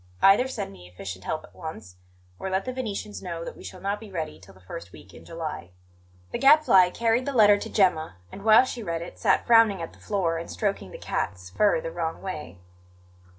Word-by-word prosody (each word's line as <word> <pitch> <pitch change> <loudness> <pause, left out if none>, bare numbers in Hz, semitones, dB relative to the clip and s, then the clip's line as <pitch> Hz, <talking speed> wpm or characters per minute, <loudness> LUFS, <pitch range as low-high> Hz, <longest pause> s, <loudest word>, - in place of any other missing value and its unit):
Either 200 +7 +6
send 260 - -5
me 90 -2 -13
efficient 95 +1 -8
help 155 - -2
at - - -16
once, 110 - -8 0.4
or 190 - -3
let 190 +1 -1
the 255 - -3
Venetians 215 -4 -5
know 170 -2 -5
that - - -7
we - - -13
shall 185 - -9
not 200 +2 -2
be 220 - -11
ready 160 -4 -4
till 95 0 -16
the - - -18
first 90 -1 -9
week 95 0 -15
in - - -13
July." 160 - -6 0.6
The - - -3
Gadfly 270 -11 +6
carried 230 +5 +1
the 280 - -1
letter 205 -4 +6
to - - -6
Gemma 165 - +2 0.2
and, - - -9
while 220 +3 +7
she 250 -2 -5
read 170 -5 -3
it, 175 - -11
sat 200 -5 +2
frowning 225 -4 +5
at 165 - -6
the - - -19
floor 175 -5 -1
and 170 - -8
stroking 200 - -2
the - - -9
cat's 90 -1 -4
fur 200 - +3
the 165 - -5
wrong 165 -1 -3
way. 155 - -6
180 Hz, 220 wpm, -26 LUFS, 155-210 Hz, 0.6 s, while